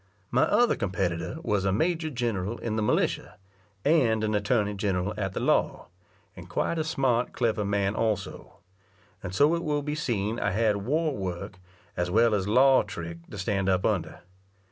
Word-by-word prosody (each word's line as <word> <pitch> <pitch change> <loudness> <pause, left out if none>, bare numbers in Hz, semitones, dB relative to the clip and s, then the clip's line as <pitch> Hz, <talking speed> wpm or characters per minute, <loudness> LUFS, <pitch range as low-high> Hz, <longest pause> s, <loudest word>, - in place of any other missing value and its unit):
My - - +4
other 240 0 +3
competitor 90 - -2
was 105 - 0
a 95 - +1
major 160 - 0
general 115 -5 -2
in 110 -2 -3
the 110 - 0
militia, 105 - 0 0.5
and 125 -8 +3
an 110 0 0
attorney 105 0 +1
general 100 -1 -1
at 95 -2 -3
the - - -3
law, - - 0 0.5
and - - -11
quite 170 - -1
a - - +1
smart, 130 -6 0
clever 115 -3 0
man 100 0 0
also; 110 -2 -3 0.6
and 90 - -5
so 145 +6 +4
it 170 0 -1
will 150 -2 -1
be 150 +1 -3
seen 115 -7 -2
I - - 0
had 105 0 +2
war 150 +9 0
work 95 -1 -5 0.4
as 90 0 -1
well 115 +4 +4
as 100 -2 0
law 130 +5 +5
trick, 85 0 -7
to 105 - -8
stand 95 0 -1
up 95 -1 +1
under. 90 -7 -1
105 Hz, 175 wpm, -27 LUFS, 95-130 Hz, 0.6 s, law